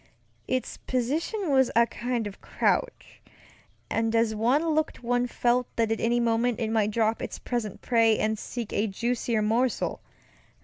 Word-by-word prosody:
Its 255 0 -2
position 300 - -1
was 265 -2 +4
a 235 0 +6
kind 235 +1 -3
of 200 -1 -8
crouch, - - -1 0.7
and 225 0 0
as 230 -1 +2
one 255 +10 +2
looked 310 -4 -1
one 245 +1 +1
felt 245 0 +1
that 225 -1 +1
at 225 - 0
any 240 +1 +2
moment 235 0 +1
it 225 -2 -1
might 215 -2 +2
drop 220 +1 0
its - - -5
present 230 -5 -4
prey 230 -2 +3
and 215 0 0
seek 235 -4 -5
a 215 - +1
juicier 230 +1 -1
morsel. 235 +4 0
235 Hz, 160 wpm, -27 LUFS, 225-250 Hz, 0.7 s, a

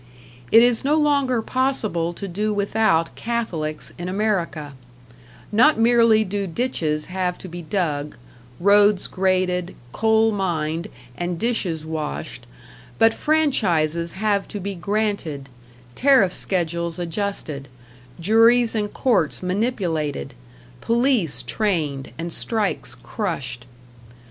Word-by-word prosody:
It 225 +1 +8
is 245 -2 +3
no 290 +3 +2
longer 280 -6 +2
possible 220 -11 0
to 195 +3 -7
do 210 +4 -2
without 200 -5 +1
Catholics 175 -10 -3
in 175 +1 -4
America; 185 -7 -1 0.8
not 250 +9 +5
merely 230 -1 +5
do 200 0 -3
ditches 165 -7 -1
have 180 -1 -2
to - - -10
be 175 0 -7
dug, 155 -5 -2 0.4
roads 205 +1 +4
graded, 185 -1 0 0.2
coal 220 - +3
mined, 170 -3 -2 0.3
and 175 0 -3
dishes 180 -8 -1
washed, 155 - -5 0.5
but 225 0 +5
franchises 175 - +1
have 200 0 0
to 205 - -6
be 200 +1 -4
granted, 195 -7 -2 0.4
tariff 255 - +4
schedules 170 -2 -2
adjusted, 170 -5 -4 0.5
juries 225 +5 +4
and 210 -2 -2
courts 195 - +1
manipulated, 180 - -2 0.5
police 230 - +1
trained 150 - -2
and 165 +1 -4
strikes 220 -3 -1
crushed. 130 - -4
190 Hz, 110 wpm, -22 LUFS, 165-225 Hz, 0.8 s, It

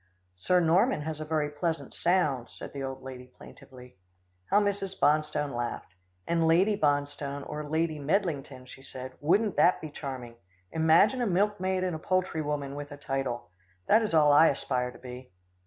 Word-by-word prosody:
"Sir 180 - +2
Norman 175 - +3
has 155 0 -5
a - - -4
very 155 -1 -1
pleasant 160 +2 -3
sound," 155 -9 +1
said - - -10
the 140 - -5
old 135 -1 -5
lady 130 -1 -9
plaintively. 125 -2 -15 0.5
How 205 - +5
Mrs. 200 -2 -2
Bonstone 150 -2 +1
laughed. 120 -6 -4 0.3
"And 165 -1 +1
Lady 185 +6 +4
Bonstone 145 -3 -1
or 150 - -5
Lady 160 0 0
Medlington," 145 -5 -2
she 130 - -13
said 130 -1 -8
"wouldn't 195 +7 +2
that 180 - +4
be 155 - -8
charming! 130 -5 -7 0.3
imagine 165 +11 +4
a 240 - +1
milkmaid 190 -1 0
and 180 -3 -1
a - - -6
poultry 185 -1 0
woman 145 -2 -3
with 145 0 -7
a 145 - -8
title. 135 -5 -3 0.3
That 220 - +5
is 210 -7 -1
all 150 -2 +6
I 160 +3 +7
aspire 125 -3 -1
to 125 - -12
be." 125 0 -10
150 Hz, 170 wpm, -28 LUFS, 135-175 Hz, 0.5 s, I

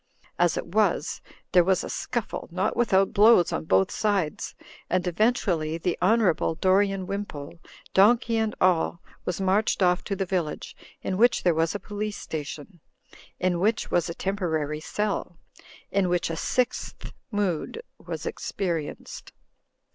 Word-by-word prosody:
As - - +3
it - - -3
was, - - 0 0.3
there 180 - +6
was 190 +1 +2
a - - -4
scuffle, - - -3
not - - 0
without 195 -5 +3
blows 210 -4 +6
on 80 0 -2
both 95 +2 +3
sides, 195 -8 -1 0.3
and 185 0 +1
eventually 180 -5 +1
the 175 +1 -1
Honourable 185 -5 +3
Dorian 190 +2 +2
Wimpole, 170 -6 -6 0.3
donkey 230 +3 +4
and 220 -1 0
all, 175 -2 +2 0.3
was 180 - -2
marched 195 +1 +2
off 180 0 +3
to 200 - -2
the 195 - -1
village, 175 -4 -3 0.3
in 185 - -2
which 240 +3 +4
there 175 - +4
was 160 +3 0
a - - -2
Police 210 0 -4
Station; 155 +3 -7 0.6
in 180 -2 +1
which 215 +4 0
was 175 -1 +1
a 170 - -5
temporary 160 -6 -2
cell; 200 0 -3 0.5
in 195 -2 +2
which 175 -1 0
a - - -2
Sixth 250 +9 -2 0.2
Mood 205 - -1 0.2
was - - -6
experienced. 170 -6 -4
185 Hz, 145 wpm, -26 LUFS, 165-205 Hz, 0.6 s, there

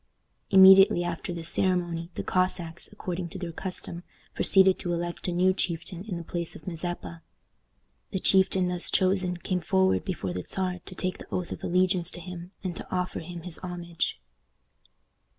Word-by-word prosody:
Immediately 190 -2 +8
after 175 0 -4
this 170 -1 -1
ceremony, 175 -3 0
the - - -3
Cossacks, 180 -2 -1
according 180 -4 -4
to 195 - -8
their 175 -2 -5
custom, 175 0 -6 0.3
proceeded 190 -1 +4
to 175 - -2
elect 170 +1 -3
a - - 0
new 185 +2 +3
chieftain 175 0 -3
in 190 -5 -4
the 170 - -6
place 170 0 -4
of 155 - -12
Mazeppa. 165 - -5 0.9
The - - -2
chieftain 190 -1 +4
thus 180 -1 -2
chosen 185 -1 +2
came 180 +1 -2
forward 190 +3 +2
before 135 - -3
the 90 - -3
Czar 185 - -3
to 185 - -8
take 185 +1 -2
the - - -11
oath 180 -2 -2
of - - -6
allegiance 180 -1 +2
to - - -7
him, 175 0 -8
and 180 -3 -3
to - - -8
offer 180 0 -1
him 170 0 -8
his 175 -2 -6
homage. 175 - -3
180 Hz, 170 wpm, -27 LUFS, 170-185 Hz, 0.9 s, Immediately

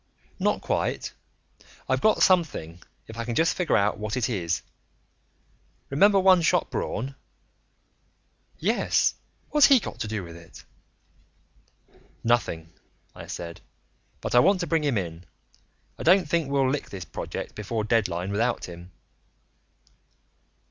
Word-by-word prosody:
"Not - - +1
quite. - - -2 0.7
I've 130 0 +1
got 215 - +4
something, 145 - +1 0.2
if 115 +1 -10
I - - -1
can 120 0 -4
just 165 +5 +3
figure 175 -9 +2
out 100 +1 +1
what 105 +2 -3
it 125 0 0
is. 85 -7 -1 1.3
Remember 200 +8 +5
One 185 -2 +6
Shot 160 - +1
Braun?" 135 +5 -3 1.4
"Yes. - - +2 0.4
What's 300 -2 +7
he 275 -3 +6
got - - -8
to - - -3
do 105 -2 -3
with 85 -1 -10
it?" 85 -1 -14 1.6
"Nothing," 85 -9 0 0.4
I - - -10
said. 85 -1 -7 0.6
"But - - -4
I 120 - +7
want 190 +7 +4
to - - -1
bring 165 -2 0
him 140 -6 +1
in. 85 -2 -5 0.7
I - - -6
don't 180 0 +4
think 165 -2 0
we'll 140 -1 +2
lick 140 +2 -2
this 95 -4 -7
project - - -6
before 105 +1 -3
deadline 100 -5 0
without 115 +4 0
him." 85 0 -10
115 Hz, 135 wpm, -26 LUFS, -, 1.6 s, What's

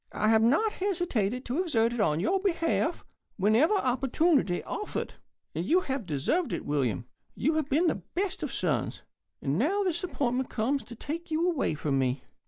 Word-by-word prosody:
I 215 - +1
have 220 0 +5
not 295 - +3
hesitated 270 - -1
to 265 +8 0
exert 235 -10 +1
it 240 - -4
in 155 -7 +2
your 370 - +1
behalf 340 -3 0 0.3
whenever 220 - +4
opportunity 265 - +2
offered. 420 - -4 0.4
And 165 - -2
you 345 - +3
have 265 - -3
deserved 160 - 0
it, - - -3
William. 130 -5 0 0.3
You've 310 +1 0
been 310 +6 +3
the - - +1
best 380 +1 -1
of - - -3
sons. - - -1 0.4
And 140 +5 0
now 385 - +2
this 350 -2 -1
appointment 260 -7 -1
comes 260 +5 0
to 235 - -10
take 330 +8 -5
you 320 +2 +1
away 315 - 0
from 140 -2 0
me. 130 +1 0
270 Hz, 175 wpm, -29 LUFS, 215-345 Hz, 0.4 s, have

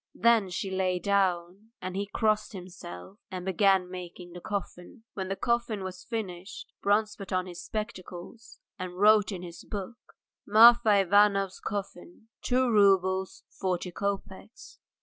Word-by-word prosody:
Then 230 -4 +3
she 185 +2 -4
lay 185 -1 0
down, 190 +1 0
and 185 0 -6
he 200 +1 -2
crossed 215 +1 0
himself 180 - -10
and 185 -2 -6
began 190 -1 +3
making 180 -1 -9
the 175 - -9
coffin. 200 +2 -6
When 190 -2 -4
the 195 - -2
coffin 235 -3 -1
was 185 -1 -7
finished 190 -4 -6
Bronze 210 +1 +2
put 195 - -9
on 185 -1 0
his 175 -2 -9
spectacles 210 0 -7 0.2
and 180 -1 -6
wrote 210 +1 +5
in 180 -2 -6
his 170 -1 -10
book: 210 +4 -8 0.3
"Marfa 220 0 +7
Ivanov's 195 0 +3
coffin, 200 +1 -7
two 255 +1 +1
roubles, 190 -2 +3
forty 180 -1 -3
kopecks." 200 +3 -6
195 Hz, 140 wpm, -28 LUFS, 180-210 Hz, 0.3 s, Marfa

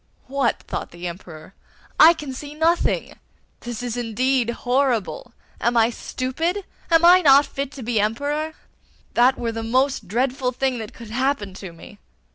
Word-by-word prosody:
'What!' 270 -2 -1
thought - - -5
the 170 +1 -10
Emperor, 170 -1 -10 0.5
'I 325 +2 +9
can 290 -4 -6
see 290 +3 -8
nothing! 330 +2 0 0.4
This 240 -1 -6
is 245 -2 -3
indeed 245 +1 0
horrible! 250 - -1 0.3
Am 240 0 +1
I 230 +1 +4
stupid? 325 - -3 0.2
Am 330 0 +5
I 360 +1 +8
not 280 -2 +6
fit 275 0 -5
to 265 - -8
be 230 -1 0
Emperor? 290 +9 -1 0.6
That 255 +2 +4
were 235 -1 -2
the 225 0 -4
most 255 -1 0
dreadful 250 +4 -1
thing 255 -1 -1
that 220 -1 -8
could 230 -2 -11
happen 250 -5 -1
to 190 -1 -9
me. 170 +5 -14
255 Hz, 160 wpm, -22 LUFS, 225-280 Hz, 0.6 s, I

